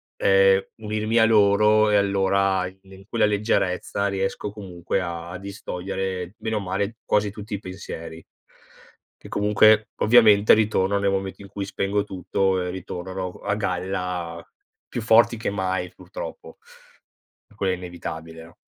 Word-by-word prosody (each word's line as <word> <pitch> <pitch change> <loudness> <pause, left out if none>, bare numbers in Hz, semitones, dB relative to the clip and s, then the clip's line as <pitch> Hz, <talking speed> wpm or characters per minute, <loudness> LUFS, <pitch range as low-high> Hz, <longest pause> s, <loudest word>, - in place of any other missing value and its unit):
ehm, 95 0 +4
unirmi 110 +1 -2
a 110 - +6
loro 105 0 +4
e 105 - +3
allora 95 -1 +2
i 95 +1 -12
in 95 0 -15
quella 115 -1 +2
leggerezza 100 -2 0
riesco, 95 +1 -2
comunque, 95 -2 -4
a 85 0 -5
distogliere 95 -1 -5
bene 110 -1 -3
o - - 0
male, 100 +3 -3
quasi 105 -1 +1
tutti 105 +1 -6
i - - -5
pensieri 85 -4 -8 0.9
che, - - -14
comunque, 105 +1 +4
ovviamente 110 -3 +6
ritornano, 100 -2 +2
nel 100 - +2
momento 95 0 -3
in 100 - -10
cui 100 0 -5
spengo 100 +1 -1
tutto 95 -1 -1
e, 90 - -3
ritornano 95 0 -5
a 100 - 0
g 105 - -6
a 90 - +1
galla 90 -2 -4 0.4
più 120 - -4
forti 115 +1 +5
che 115 - -2
mai, 95 -2 -2
purtroppo. - - -9 1.0
Quel 95 -2 0
è - - +1
inevitabile, 80 -2 -8
no? 80 0 -17
95 Hz, 150 wpm, -24 LUFS, 95-105 Hz, 1.0 s, a